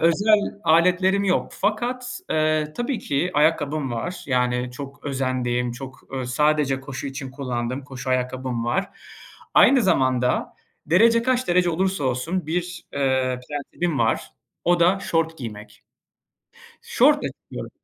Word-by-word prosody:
özel 200 Hz, +7 st, +4 dB, 0.3 s
aletlerim 180 Hz, +4 st, +3 dB
yok. 185 Hz, -, +1 dB
Fakat, 245 Hz, -, -2 dB
eee, 155 Hz, -1 st, +1 dB
tabii 240 Hz, 0 st, -1 dB
ki 150 Hz, +6 st, -1 dB
ayakkabım 150 Hz, -3 st, +1 dB
var, 175 Hz, +10 st, -4 dB
yani, 125 Hz, -1 st, 0 dB
çok 140 Hz, +3 st, -9 dB
özendiğim, 125 Hz, -3 st, -1 dB
çok, 130 Hz, +2 st, -9 dB
eee, 130 Hz, -1 st, -3 dB
sadece 140 Hz, +1 st, +1 dB
koşu 135 Hz, +1 st, -6 dB
için 135 Hz, -1 st, -6 dB
kullandığım 130 Hz, -1 st, -4 dB
koşu 130 Hz, -1 st, -6 dB
ayakkabım 125 Hz, -1 st, -1 dB
var. 190 Hz, +11 st, 0 dB, 0.7 s
Aynı 260 Hz, -3 st, +6 dB
zamanda 130 Hz, -8 st, +1 dB, 0.3 s
derece 230 Hz, +8 st, +5 dB
kaç 255 Hz, -1 st, 0 dB
derece 175 Hz, 0 st, +3 dB
olursa 185 Hz, -2 st, 0 dB
olsun 150 Hz, +8 st, -1 dB
bir, 175 Hz, +1 st, -3 dB
eee, 130 Hz, -2 st, 0 dB
prensibim 150 Hz, +2 st, -3 dB
var, 115 Hz, -1 st, 0 dB, 0.3 s
o 175 Hz, 0 st, +3 dB
da 180 Hz, +3 st, +4 dB
şort 165 Hz, -3 st, -1 dB
giymek. 105 Hz, -4 st, -9 dB, 1.0 s
Şortla -, -, +3 dB
çıkıyorum. -, -, -8 dB
145 Hz, 130 wpm, -23 LUFS, 130-180 Hz, 1.0 s, Aynı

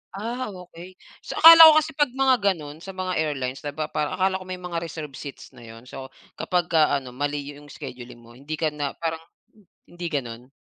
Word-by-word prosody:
Ah, 235 Hz, +5 st, -4 dB
okey. 180 Hz, 0 st, -12 dB, 0.2 s
So, -, -, -8 dB
akala 330 Hz, 0 st, +11 dB
ko 310 Hz, -, +8 dB
kasi 310 Hz, +1 st, -5 dB
'pag 295 Hz, -3 st, 0 dB
mga 265 Hz, -1 st, +3 dB, 0.2 s
gano'n 150 Hz, -2 st, -10 dB
sa 190 Hz, +2 st, -10 dB
mga 185 Hz, -1 st, -3 dB
airlines 135 Hz, -4 st, -3 dB
di 145 Hz, -1 st, -6 dB
ba, 155 Hz, 0 st, -4 dB
parang 150 Hz, -1 st, -2 dB
akala 190 Hz, 0 st, 0 dB
ko 185 Hz, -, -11 dB
may 185 Hz, -, -5 dB
mga 175 Hz, -2 st, -4 dB
reserved 155 Hz, -4 st, -8 dB
seats 140 Hz, -2 st, -10 dB
na 125 Hz, -3 st, -16 dB
'yon. 115 Hz, +1 st, -13 dB
So, 130 Hz, +1 st, -9 dB, 0.3 s
kapag 175 Hz, -2 st, -1 dB
ka 155 Hz, -3 st, +3 dB
ano, 130 Hz, -2 st, -5 dB
mali 145 Hz, +3 st, -3 dB
'yong 145 Hz, 0 st, -15 dB
scheduling 125 Hz, -5 st, -10 dB
mo 115 Hz, -, -17 dB
hindi 140 Hz, +6 st, -7 dB
ka 155 Hz, 0 st, -1 dB
na 145 Hz, -2 st, -4 dB
parang 165 Hz, -1 st, -4 dB, 0.7 s
hindi 175 Hz, 0 st, -7 dB
gano'n? 120 Hz, -4 st, -5 dB
155 Hz, 210 wpm, -24 LUFS, 140-185 Hz, 0.7 s, akala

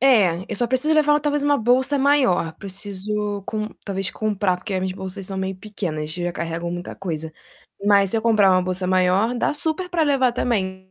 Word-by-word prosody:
É, 205 Hz, -10 st, +4 dB
eu -, -, -3 dB
só 240 Hz, -, +1 dB
preciso 260 Hz, +6 st, +2 dB
levar 295 Hz, -1 st, +4 dB
talvez 295 Hz, -1 st, 0 dB
uma 290 Hz, 0 st, +3 dB
bolsa 260 Hz, +5 st, +2 dB
maior. 265 Hz, -, +3 dB
Preciso 205 Hz, +1 st, -4 dB
com 215 Hz, 0 st, -3 dB, 0.2 s
talvez 195 Hz, -2 st, -2 dB
comprar, 205 Hz, -4 st, 0 dB
porque 190 Hz, +2 st, -6 dB
as 185 Hz, -, 0 dB
minhas 185 Hz, 0 st, -2 dB
bolsas 190 Hz, 0 st, -6 dB
são 195 Hz, -, -5 dB
meio 190 Hz, 0 st, -3 dB
pequenas, 170 Hz, -7 st, -5 dB
já 175 Hz, 0 st, -3 dB
carregam 170 Hz, +1 st, -4 dB
muita 175 Hz, 0 st, -5 dB
coisa, 160 Hz, -4 st, -5 dB, 0.5 s
mas 200 Hz, -2 st, +4 dB
se -, -, 0 dB
eu 220 Hz, -, -1 dB
comprar 215 Hz, -4 st, +4 dB
uma 185 Hz, 0 st, +3 dB
bolsa 185 Hz, 0 st, -2 dB
maior, 185 Hz, +5 st, +2 dB
dá 240 Hz, -, 0 dB
super 320 Hz, +4 st, -1 dB
pra 345 Hz, -2 st, +1 dB
levar 265 Hz, -4 st, +3 dB
também, 190 Hz, -6 st, -2 dB
200 Hz, 200 wpm, -22 LUFS, 185-250 Hz, 0.5 s, É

